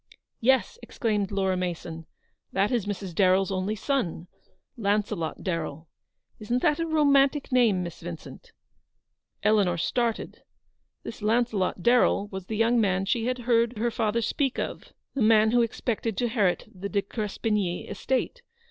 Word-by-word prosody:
" - - -56
Yes," 265 - -1
exclaimed 210 -5 -1
Laura 190 -2 +1
Mason, 170 -2 -4 0.4
"that 195 +4 +1
is 235 -5 0
Mrs. 195 -3 -4
Darren's 190 +2 +3
only 190 +3 -1
son, 215 - -2 0.5
Launcelot 205 -6 -1
Darrell. 160 -3 -4 0.5
Isn't 235 +3 -1
that 305 -1 +3
a 330 - -1
romantic 285 -3 +3
name, 230 -8 +3
Miss 170 -1 -8
Vincent? 170 -1 -9 0.5
" - - -52
Eleanor 200 -5 +3
started. 235 +6 -1 0.6
This 225 - -8
Launcelot 215 -5 0
Darrell 240 -3 +3
was 190 -2 -7
the 220 - -3
young 230 +1 +3
man 190 -2 +1
she 225 +3 0
had 255 0 0
heard 235 -1 +2
her 235 +2 0
father 225 +1 0
speak 270 +3 -1
of; - - -5 0.2
the 275 - -2
man 220 0 +5
who 240 0 +4
expected 225 -2 -2
to - - 0
inherit 215 -6 +1
the 195 +2 -6
De 200 -1 0
Crespigny 210 -3 -2
estate. 265 - -2
215 Hz, 150 wpm, -26 LUFS, 190-240 Hz, 0.6 s, man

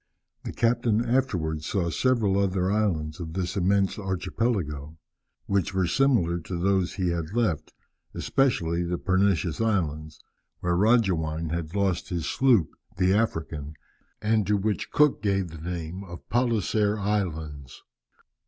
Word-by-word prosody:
The - - -3
captain 115 -1 +1
afterwards 85 -12 0
saw 85 -4 0
several 110 -3 +2
other 95 -1 +1
islands 85 -8 0
of 80 -2 -6
this 90 -1 -2
immense 100 +1 +1
archipelago, 95 -6 -2 0.5
which 100 -1 0
were 95 -1 +2
similar 90 -6 +2
to 85 +2 -5
those 95 0 +1
he 90 -3 0
had 85 +3 -3
left, 85 -11 0 0.4
especially 85 -11 +1
the 90 0 -1
Pernicious 95 -3 +1
Islands, 80 -8 -1 0.4
where 90 0 +1
Roggewein 85 -7 +2
had 85 +1 -4
lost 95 -3 0
his 85 -3 -2
sloop, 120 -12 +2 0.2
the 95 0 +3
African, 80 -8 -1 0.5
and 110 -1 +2
to 105 0 +3
which 105 +1 -2
Cook 150 -2 +3
gave 95 -4 0
the 80 0 -10
name 90 +2 -5
of 85 -3 -11
Palliser 110 -3 +1
Islands." 80 - -3
95 Hz, 135 wpm, -26 LUFS, 85-105 Hz, 0.5 s, the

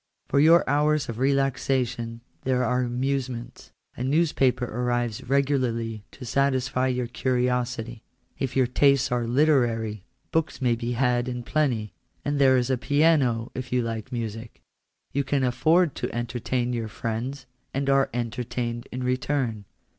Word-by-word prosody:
For 140 - +3
your 165 +4 +6
hours 150 -1 +2
of 115 0 -5
relaxation 130 -3 0 0.2
there 125 -1 +1
are 125 +1 +1
amusements. 125 0 -3 0.2
A 125 - -4
newspaper 135 -3 +2
arrives 120 -1 -2
regularly 125 -6 0
to 130 - -9
satisfy 130 0 +1
your 125 -1 0
curiosity; 125 -2 -1 0.4
if 135 -2 -2
your 130 -1 +4
tastes 135 +2 +3
are 120 -1 0
literary, 120 -6 +2 0.3
books 160 -1 0
may 125 -3 +2
be 120 +1 -2
had 120 0 +1
in 125 -1 -4
plenty: 120 - 0 0.3
and 145 0 0
there 130 -2 +6
is 125 +1 0
a 130 - +1
piano 140 -6 +2
if 130 -1 -6
you 125 -1 +2
like 115 +2 -4
music. 115 -1 -5 0.5
You 140 - 0
can 140 0 0
afford 155 +6 +3
to - - -3
entertain 120 +1 -2
your 115 -2 -2
friends, 120 +5 -4 0.3
and 135 +1 -2
are 135 0 +3
entertained 120 0 -3
in 125 +1 -4
return. 125 -4 -1
125 Hz, 145 wpm, -25 LUFS, 120-135 Hz, 0.5 s, your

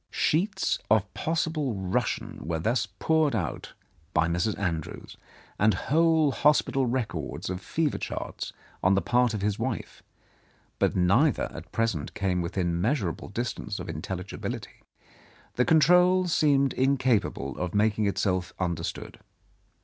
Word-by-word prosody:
Sheets 190 +7 +1
of 105 -2 +2
possible 155 -6 -1
Russian 95 -1 -2
were 80 +1 -2
thus 110 +10 0
poured 160 -5 +1
out 90 -7 -4 0.4
by 80 0 +3
Mr. 85 +5 0
Andrews, 85 -6 -4 0.4
and 110 +1 +4
whole 160 -1 +3
hospital 135 -2 +2
records 120 -6 -3
of 95 0 -4
fever 155 +7 -1
charts - - -5 0.3
on 95 +1 +4
the 100 - +2
part 120 -2 +2
of 100 - -3
his 105 -1 0
wife, - - -4 0.8
but - - +2
neither 115 - +3
at - - -10
present 115 -10 -1
came 90 -3 0
within 85 0 -1
measurable 105 - -1
distance 105 -1 -4
of - - -6
intelligibility. 90 +4 -6 0.7
The 125 - +2
control 180 +4 +5
seemed 140 -5 +3
incapable 130 -4 +1
of 90 0 -3
making 105 0 +2
itself 90 -2 -1
under 85 -3 -1
stood. - - -6
110 Hz, 130 wpm, -27 LUFS, 90-140 Hz, 0.8 s, control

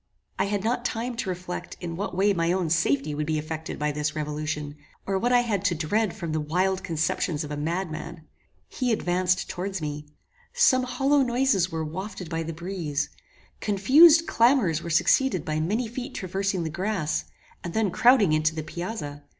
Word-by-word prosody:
I - - +3
had 200 -1 -2
not 240 +2 0
time 240 +1 -2
to 195 - -2
reflect 180 0 -5
in 170 -2 -5
what 185 0 -4
way 200 +2 +4
my 170 -2 +1
own 180 -3 0
safety 150 -3 +1
would 150 +1 -3
be 155 -1 0
effected 160 +1 -5
by 150 0 0
this 150 +1 -2
revolution, 150 -1 -3 0.3
or 195 -1 0
what 245 +5 +1
I 245 0 +5
had 210 -6 -1
to 180 -4 +2
dread 190 +6 0
from 170 -3 -5
the 155 - 0
wild 185 +5 0
conceptions 160 -1 -1
of 150 - -7
a - - -2
madman. 165 +1 -4 0.4
He 250 -2 -1
advanced 185 -3 +1
towards 190 +1 -4
me. 150 -1 -5 0.5
Some 260 - +4
hollow 275 +3 +2
noises 240 -7 +2
were 160 -1 -2
wafted 180 +1 -6
by 165 0 -1
the 165 0 -4
breeze. 165 -4 -3 0.5
Confused 295 - +6
clamours 230 - +3
were 170 - -6
succeeded 175 - +2
by 155 0 -1
many 210 +10 0
feet 255 +4 -6
traversing 190 -1 -2
the 160 - -3
grass, 185 -2 -1 0.4
and 170 - -6
then 220 -4 +1
crowding 235 -6 +5
intO 155 +1 +2
the 155 - -3
piazza. 160 -3 -5
180 Hz, 185 wpm, -26 LUFS, 155-215 Hz, 0.5 s, Confused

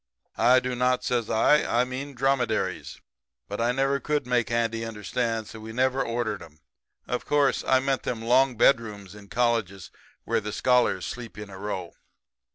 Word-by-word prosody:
"'I 125 +1 +5
do 125 0 -3
not,' 125 0 +1
says 120 -3 -1
I. 150 +7 +4
'I 120 +1 +2
mean 130 +2 -6
dromedaries.' 135 -1 -1 0.5
But 105 +3 -4
I 120 +1 +2
never 135 +2 +1
could 150 -2 -1
make 125 -2 +1
Andy 115 -1 0
understand; 115 +1 -2
so 110 - -10
we 110 +1 -8
never 130 +2 +1
ordered 115 -3 -2
'em. 75 -1 -14 0.5
Of 125 - -3
course, 145 -2 +2
I 130 - +3
meant 135 -1 0
them 115 -2 -4
long 125 +1 +3
bedrooms 105 -6 +2
in 105 -1 -13
colleges 115 -5 -1 0.3
where 115 0 0
the 105 0 -5
scholars 125 -7 +2
sleep 120 -3 -7
in 105 -1 -8
a 95 - -10
row. 95 -4 -5
120 Hz, 170 wpm, -26 LUFS, 110-130 Hz, 0.5 s, I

